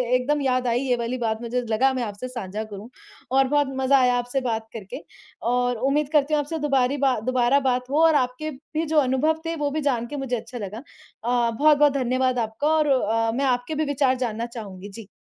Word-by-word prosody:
एकदम 290 Hz, +4 st, 0 dB
याद 255 Hz, -2 st, +1 dB
आई 235 Hz, +1 st, +2 dB
ये 255 Hz, -2 st, +1 dB
वाली 235 Hz, +2 st, -3 dB
बात, 225 Hz, -2 st, -2 dB
मुझे 240 Hz, +1 st, -2 dB
लगा 260 Hz, +5 st, +3 dB
मैं 255 Hz, -2 st, -2 dB
आपसे 210 Hz, +3 st, -5 dB
साँझा 215 Hz, -4 st, -5 dB
करूँ 215 Hz, +1 st, -9 dB, 0.4 s
और 270 Hz, 0 st, +4 dB
बहुत 290 Hz, 0 st, +2 dB
मज़ा 265 Hz, +1 st, +4 dB
आया 250 Hz, -1 st, +3 dB
आपसे 245 Hz, +2 st, -2 dB
बात 225 Hz, -3 st, -2 dB
करके 195 Hz, -5 st, -8 dB, 0.5 s
और 245 Hz, -1 st, +1 dB
उम्मीद 290 Hz, +1 st, +1 dB
करती 300 Hz, 0 st, +2 dB
हूँ 300 Hz, -, +3 dB
आपसे 310 Hz, +3 st, -3 dB
दोबरी 275 Hz, -2 st, +1 dB
बा 270 Hz, -4 st, +2 dB
दोबारा 255 Hz, +3 st, +2 dB
बात 250 Hz, 0 st, 0 dB
हो 305 Hz, +3 st, +3 dB
और 320 Hz, -2 st, +4 dB
आपके 260 Hz, +3 st, -1 dB
भी 305 Hz, +3 st, -5 dB
जो 315 Hz, 0 st, -1 dB
अनुभव 290 Hz, +4 st, +1 dB
थे, 330 Hz, 0 st, -2 dB
वो 295 Hz, -2 st, -1 dB
भी 310 Hz, +1 st, -2 dB
जान 245 Hz, -5 st, 0 dB
के 290 Hz, -, -7 dB
मुझे 265 Hz, -2 st, -2 dB
अच्छा 240 Hz, +2 st, -7 dB
लगा। 210 Hz, -1 st, -6 dB, 0.5 s
अ, 240 Hz, 0 st, +1 dB
बहुत-बहुत 290 Hz, +3 st, +4 dB
धन्यवाद 255 Hz, -1 st, 0 dB
आपका 225 Hz, +6 st, -2 dB
और 305 Hz, -1 st, +2 dB
अ, 225 Hz, -4 st, +1 dB
मैं 275 Hz, +2 st, 0 dB
आपके 250 Hz, +3 st, 0 dB
भी 310 Hz, +1 st, 0 dB
विचार 275 Hz, -2 st, +1 dB
जानना 235 Hz, -2 st, -2 dB
चाहूँगी, 205 Hz, -5 st, -9 dB
जी। 210 Hz, +1 st, -11 dB
255 Hz, 215 wpm, -24 LUFS, 235-280 Hz, 0.5 s, और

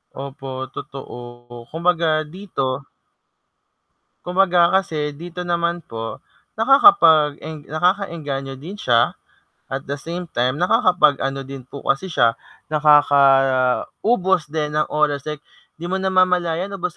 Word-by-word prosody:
Opo, 135 Hz, 0 st, -8 dB, 0.3 s
totoo. 120 Hz, -2 st, -10 dB
Kumbaga 165 Hz, -2 st, +1 dB
dito 150 Hz, -6 st, -4 dB, 1.5 s
kumbaga 180 Hz, -1 st, +3 dB
kasi 160 Hz, -6 st, 0 dB
dito 175 Hz, +4 st, -8 dB
naman 170 Hz, 0 st, -1 dB
po, 115 Hz, -1 st, -7 dB, 0.4 s
nakakapag-eng 160 Hz, -, +4 dB
nakaka-engganyo 155 Hz, -6 st, -2 dB
din 175 Hz, +10 st, -9 dB
siya 120 Hz, -, +2 dB, 0.5 s
at 135 Hz, +1 st, -5 dB
the 140 Hz, -, -2 dB
same 170 Hz, +3 st, -6 dB
time 125 Hz, +5 st, -1 dB
nakakapag 180 Hz, -, +3 dB
ano 135 Hz, 0 st, -2 dB
din 135 Hz, -1 st, -9 dB
po 140 Hz, +2 st, -10 dB
kasi 135 Hz, +8 st, 0 dB
siya, 120 Hz, -6 st, +2 dB, 0.3 s
nakaka-ubos 145 Hz, -, +3 dB
din 150 Hz, -1 st, -2 dB
ng 155 Hz, -, +2 dB
oras, 145 Hz, -2 st, 0 dB
eh, 150 Hz, -1 st, -6 dB, 0.4 s
di -, -, -7 dB
mo 190 Hz, -, -1 dB
namamalayan 185 Hz, -1 st, +1 dB
ubos 180 Hz, -3 st, -4 dB
155 Hz, 115 wpm, -20 LUFS, 135-180 Hz, 1.5 s, nakakapag-eng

